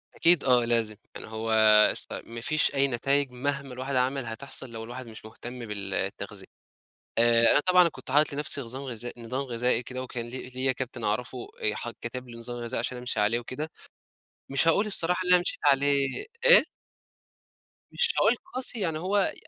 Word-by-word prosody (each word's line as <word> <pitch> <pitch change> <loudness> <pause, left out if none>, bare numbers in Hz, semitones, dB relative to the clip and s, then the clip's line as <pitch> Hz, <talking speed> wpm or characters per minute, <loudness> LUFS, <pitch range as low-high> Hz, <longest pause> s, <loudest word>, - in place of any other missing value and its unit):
أكيد 170 -2 +5
آه، 125 -2 +3
لازم 115 -2 0 0.2
يعني - - -8
هو 110 +1 -5 0.4
اس - - +1
ما 115 0 -8
فيش 155 +3 0
أي 140 0 +3
نتايج 135 +2 +1
مهما 140 +1 -3
الواحد 130 +2 -4
عمل 130 +1 0
هتحصل 130 +3 -6
لو 115 -1 -7
الواحد 125 +2 -9
مش 110 -1 -12
مُهتم 120 +2 -9
بالتغذية، 100 -2 -4 0.7
آآ 115 0 +5
أنا - - +4
طبعًا 180 +1 +4
كنت 130 -5 -10
حاطط 150 +3 +3
لنفسي 145 0 +1
نظام 130 +1 -5
غذائي 120 -2 -6
نظام 125 +4 -3
غذائي 125 -1 0
كده، 130 +1 -6
وكان 120 -2 -6
لي 130 +1 -7
ليا 130 +1 -1
كابتن 130 -2 -6
أعرفه 125 +5 -2 0.2
آآ 105 - +2
ح 120 - -5
كتب 125 +1 -6
لي 120 - -11
نظام 120 +1 -5
غذائي 120 +1 -4
عشان 125 +2 -3
أمشي 125 -3 -1
عليه 110 +3 +1
وكده، 150 +6 -6 0.8
مش 135 +4 +2
هاقول 200 +6 +3
الصراحة 180 -3 +3
اللي 180 - +6
أنا 180 - +6
مشيت - - -1
عليه 140 -1 +1 0.2
إيه؟ - - +8 1.3
مش 485 - +3
هاقول 240 - +3 0.2
قاسي، 250 -2 +2
يعني 165 -6 -1
هو 195 +3 0
130 Hz, 180 wpm, -26 LUFS, 120-140 Hz, 1.3 s, إيه